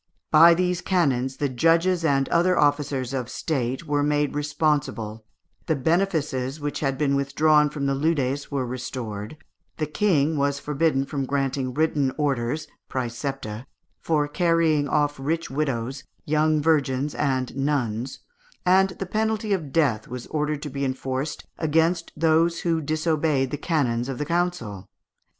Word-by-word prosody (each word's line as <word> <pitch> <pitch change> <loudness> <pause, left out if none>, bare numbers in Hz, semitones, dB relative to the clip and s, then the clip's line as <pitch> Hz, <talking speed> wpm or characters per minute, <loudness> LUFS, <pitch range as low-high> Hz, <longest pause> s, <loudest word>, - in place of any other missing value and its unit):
By 165 +2 +8
these 180 0 0
canons 135 -8 +1
the 145 - 0
judges 165 +7 +2
and 140 -3 +2
other 175 +1 +3
officers 145 -3 +1
of 125 -3 -3
State 130 -1 -2
were 145 -1 +1
made 145 0 +1
responsible, 145 -7 -1 0.4
the 160 - +2
benefices 150 -4 0
which 145 0 -3
had 135 -2 -1
been 140 -1 +1
withdrawn 150 +2 +3
from 145 -2 -4
the 140 - +1
leudes 140 -2 0
were 140 -3 -1
restored, 120 -2 -5 0.4
the 155 - 0
King 155 -3 +1
was 140 0 +1
forbidden 145 -1 0
from 140 -2 -3
granting 135 -2 -1
written 150 -4 +1
orders 145 0 -1 0.2
(præcepta) 125 -2 -4 0.3
for 150 -3 +1
carrying 165 -2 +2
off 145 -2 +1
rich 160 +4 -2
widows, 135 -2 -2 0.2
young 155 0 +2
virgins, 145 -3 +1
and 130 -4 -1
nuns; 135 -4 -1 0.4
and 190 +1 +5
the 195 - -3
penalty 215 +1 0
of 160 -8 -3
death 135 -10 +1
was 125 0 -6
ordered 150 -1 -1
to 150 - -5
be 140 +1 -3
enforced 130 +2 -3
against 165 +2 +1
those 165 +2 +2
who 165 -2 0
disobeyed 155 -3 0
the - - -1
canons 135 -6 0
of 135 - -4
the 150 - -2
council. 170 - -2
145 Hz, 145 wpm, -24 LUFS, 135-160 Hz, 0.4 s, By